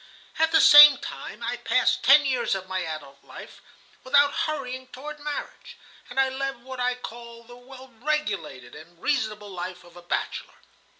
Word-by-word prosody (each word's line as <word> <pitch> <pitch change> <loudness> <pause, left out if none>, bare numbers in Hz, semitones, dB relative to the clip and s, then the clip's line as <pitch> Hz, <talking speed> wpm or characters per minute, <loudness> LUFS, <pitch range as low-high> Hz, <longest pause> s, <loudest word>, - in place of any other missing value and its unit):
"At 320 0 +2
the 320 - +5
same 295 -1 +9
time, - - -9
I - - -3
passed - - +1
ten 295 -1 +6
years 255 -6 0
of 190 -1 -7
my 185 -1 -3
adult 150 -4 -8
life - - -13 0.4
without 285 +2 +3
hurrying 260 -4 -4
toward 295 +4 -10
marriage, 300 +11 -7 0.3
and 245 +2 -4
I 270 - +3
led 265 -2 -5
what 260 0 -9
I 250 0 0
called 235 -1 -11
the 245 - -13
well 255 +1 -15
regulated 200 - -3
and 170 +2 -15
reasonable 215 -7 -2
life 180 0 -7
of 175 0 -19
a 175 - -12
bachelor. 175 - -4
250 Hz, 170 wpm, -25 LUFS, 190-280 Hz, 0.4 s, same